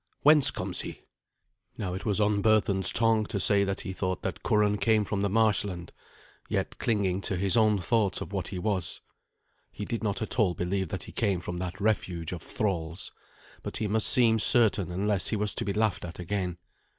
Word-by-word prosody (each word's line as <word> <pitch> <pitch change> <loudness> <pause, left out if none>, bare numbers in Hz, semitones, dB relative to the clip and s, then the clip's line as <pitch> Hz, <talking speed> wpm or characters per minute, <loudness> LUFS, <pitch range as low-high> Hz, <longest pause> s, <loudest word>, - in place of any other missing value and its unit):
Whence 150 -1 +7
comes - - -2
he?" - - -8 0.8
Now 95 -3 -3
it 95 - -6
was 105 -1 +1
on 105 -1 +2
Berthun's 100 -3 +3
tongue 115 -2 +2
to 100 - -3
say 100 +1 +3
that 95 -1 -2
he 95 - -5
thought 95 -1 -3
that - - -4
Curan 105 -1 +2
came 110 +1 +2
from 100 0 -2
the 100 - +1
marshland, 100 -4 0 0.6
yet - - -2
clinging 100 -4 0
to 100 - -2
his 95 +1 +3
own 110 -2 +4
thoughts 100 0 +1
of - - -7
what 95 -2 -2
he 95 - -6
was. 95 -2 -2 0.7
He 105 - -6
did 115 +1 -3
not 105 0 -1
at 110 - -4
all 95 -6 +3
believe 95 +1 -1
that - - -4
he - - -9
came 100 -5 0
from 90 0 -5
that 90 +1 -5
refuge 90 -6 -1
of 90 - -5
thralls. 85 -4 -3 0.5
But - - -5
he 110 - -2
must 110 +1 +1
seem 115 -4 +4
certain 105 -6 +3
unless 100 +2 +1
he - - +1
was 105 -1 -1
to - - -3
be 100 - -1
laughed 110 0 0
at 85 -1 -7
again. 90 -1 -3
100 Hz, 200 wpm, -28 LUFS, 95-110 Hz, 0.8 s, Whence